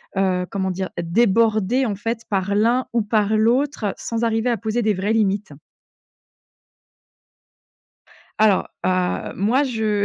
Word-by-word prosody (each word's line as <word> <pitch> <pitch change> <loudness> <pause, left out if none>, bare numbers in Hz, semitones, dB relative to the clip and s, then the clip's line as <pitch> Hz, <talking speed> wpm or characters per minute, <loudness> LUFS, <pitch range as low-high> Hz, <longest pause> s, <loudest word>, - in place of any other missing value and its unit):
heu, 185 -2 +1
comment 190 -1 -2
dire? 185 +1 -4
Débordé 220 +5 +2
en 210 -4 -2
fait 225 +3 -3
par 200 0 0
l'un 235 +5 +2
ou 235 - +2
par 210 0 +1
l'autre, 230 -1 +1
sans 230 0 -3
arriver 225 +1 +1
à 240 - +2
poser 220 +2 -2
des 215 -2 +2
vraies 200 +3 -1
limites. 205 -4 0 2.9
Alors. 215 -3 +3 0.2
Heu, 185 -1 0
moi 235 +9 +2
je, 220 -5 0
215 Hz, 130 wpm, -21 LUFS, 195-230 Hz, 2.9 s, Alors